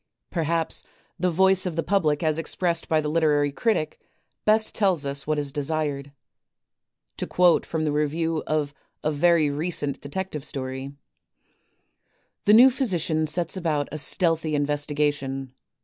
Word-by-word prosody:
Perhaps 165 -1 -1 0.4
the 180 - +2
voice 190 +2 +3
of 170 - -4
the 165 - -1
public 155 -4 +1
as 155 0 +1
expressed 170 +1 -1
by 160 - +3
the 150 - -3
literary 150 -2 +2
critic 155 - -1 0.5
best 215 +1 +3
tells 185 -8 +1
us 140 0 -2
what 155 0 0
is 145 -1 -2
desired. 145 -1 -2 1.1
To - - -3
quote 180 -2 +3
from 160 -1 -2
the 150 - 0
review 155 +2 -1
of 150 -2 -1 0.3
a 155 - +1
very 155 0 +3
recent 145 -2 -2
Detective 155 0 -5
Story: 130 -1 -5 1.5
"The 210 - +6
new 250 +4 +8
physician 175 - -1
sets 170 +4 -2
about 155 -6 -1
a 155 - -3
stealthy 165 -1 +1
investigation. 145 -2 -1
155 Hz, 140 wpm, -24 LUFS, 145-175 Hz, 1.5 s, new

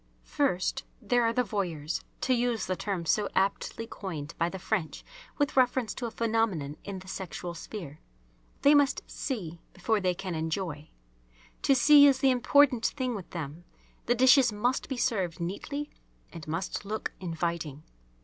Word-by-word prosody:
First, 270 -12 0 0.2
there 245 +1 +2
are 230 -1 +3
the 250 +2 +1
"Voyeurs," 175 -8 -3 0.2
to 255 - +2
use 240 -3 0
the 185 - -1
term 185 -3 -3
so 205 +5 +1
aptly 195 +4 0
coined 165 -8 -6
by 170 0 +2
the 190 - -6
French 185 -3 -2 0.3
with 290 -1 0
reference 255 -2 +2
to 240 - -4
a - - -4
phenomenon 225 -11 0
in 200 -1 -5
the 185 0 -11
sexual 180 -2 -5
sphere. 165 -4 -8 0.6
They 285 - +7
must 285 -2 +3
"see" 175 - -5
before 210 +4 0
they 185 -2 0
can 190 -1 -5
enjoy. 160 -1 -3 0.7
To 275 - +4
see 285 +2 +8
is 275 -2 +4
the 265 0 +4
important 255 -1 +4
thing 255 -3 -2
with 195 -6 -7
them. 160 0 -6 0.4
The 240 - +3
dishes 255 0 +6
must 240 +5 -1
be 265 - -3
served 185 -9 0
neatly 280 - -4 0.4
and 165 -3 -9
must 165 +7 -3
look 215 +2 -3
inviting. 165 -4 -3
200 Hz, 160 wpm, -29 LUFS, 170-245 Hz, 0.7 s, see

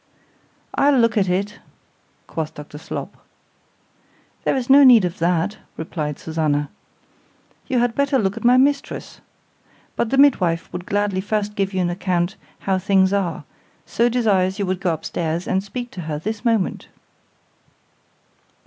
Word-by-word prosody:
—I'll 280 -1 +3
look 230 -2 +3
at 195 -4 +2
it, 200 +4 -2 0.7
quoth 160 -1 -5
Dr 150 0 -10
Slop.—There - - -9
is 255 -2 -2
no 280 +1 +7
need 240 -7 +7
of 175 - -4
that, 175 +4 0 0.2
replied 155 -2 -4
Susannah,—you 155 - -5
had 240 -1 +2
better 280 +2 +1
look 200 -5 0
at - - -8
my 245 +1 +5
mistress—but 275 -3 -3
the 270 - 0
midwife 185 -14 +3
would 180 0 -6
gladly 205 -2 0
first 210 +1 -2
give 195 -2 -1
you 190 -1 -1
an 175 -1 0
account 180 +1 -1 0.3
how 190 -1 0
things 190 0 +3
are, 180 -7 -1 0.4
so 235 +1 +1
desires 200 -6 +1
you 200 - -1
would 185 0 -2
go 180 -3 +1
up 160 - -5
stairs 170 +1 -3
and 190 +1 0
speak 240 +4 -6
to 185 - -7
her 155 -2 -4
this 210 +7 -5
moment. 225 -6 0
195 Hz, 145 wpm, -21 LUFS, 175-230 Hz, 0.7 s, no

